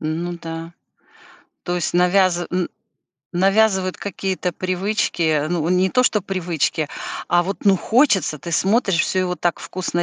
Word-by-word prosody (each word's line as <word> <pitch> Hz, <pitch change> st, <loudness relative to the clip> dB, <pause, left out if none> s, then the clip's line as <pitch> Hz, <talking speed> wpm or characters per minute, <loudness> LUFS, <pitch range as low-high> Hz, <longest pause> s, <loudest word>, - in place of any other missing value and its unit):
Ну 165 Hz, +3 st, -3 dB
да, 165 Hz, 0 st, -6 dB, 0.9 s
то 175 Hz, -, -2 dB
есть 175 Hz, -1 st, -2 dB
навяз 180 Hz, 0 st, +3 dB
н 180 Hz, -1 st, -1 dB, 0.6 s
навязывают 190 Hz, 0 st, +2 dB
какие-то 190 Hz, -2 st, -3 dB
привычки. 180 Hz, -5 st, 0 dB
Ну, 170 Hz, -2 st, -1 dB
не 185 Hz, +1 st, +2 dB
то 250 Hz, -, +3 dB
что 210 Hz, -5 st, +1 dB
привычки, 175 Hz, -5 st, -1 dB, 0.4 s
а 175 Hz, 0 st, +4 dB
вот, 195 Hz, +2 st, -5 dB
ну, 195 Hz, -1 st, +6 dB
хочется. 215 Hz, -, +2 dB
Ты 170 Hz, -, -7 dB
смотришь: 195 Hz, +1 st, +2 dB
всё 190 Hz, -, 0 dB
его 180 Hz, -1 st, -1 dB
так 175 Hz, -1 st, -1 dB
вкусно 180 Hz, -1 st, -3 dB
180 Hz, 145 wpm, -21 LUFS, 170-195 Hz, 0.9 s, ну